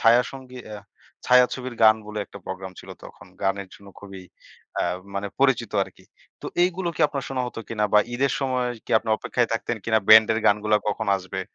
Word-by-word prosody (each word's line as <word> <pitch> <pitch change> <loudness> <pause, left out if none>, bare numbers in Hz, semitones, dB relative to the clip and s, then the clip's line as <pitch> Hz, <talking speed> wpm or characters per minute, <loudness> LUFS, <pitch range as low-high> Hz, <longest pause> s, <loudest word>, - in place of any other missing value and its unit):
ছায়াসঙ্গী 125 +2 +2
আ - - -6 0.5
ছায়াছবির 125 0 +3
গান 110 0 +7
বলে, 105 0 -6
একটা 100 - -12
প্রোগ্রাম 95 0 -6
ছিল - - -13
তখন। 85 - -13 0.2
গানের 95 0 -1
জন্য 100 -1 -15
খুবই, 95 -2 -10 0.6
আ - - +2 0.3
মানে 100 +1 -2
পরিচিত 125 -5 +2
আরকি। - - -11 0.4
তো - - -7 0.2
এইগুলো 180 0 0
কি - - -6
আপনার 140 -2 -5
শোনা 130 -1 -2
হত - - -9
কিনা, 105 -2 -1
বা 105 - +7 0.2
ঈদের 135 +2 +1
সময় 130 -2 0 0.2
কি, - - -13
আপনি 110 - -10
অপেক্ষায় 120 +1 -1
থাকতেন 115 +1 -2
কিনা, 110 -1 +3
ব্যান্ডের 110 0 +7
গানগুলা 105 +1 +3
কখন 110 +1 -2
আসবে? 95 0 -6
110 Hz, 180 wpm, -24 LUFS, 100-125 Hz, 0.6 s, গান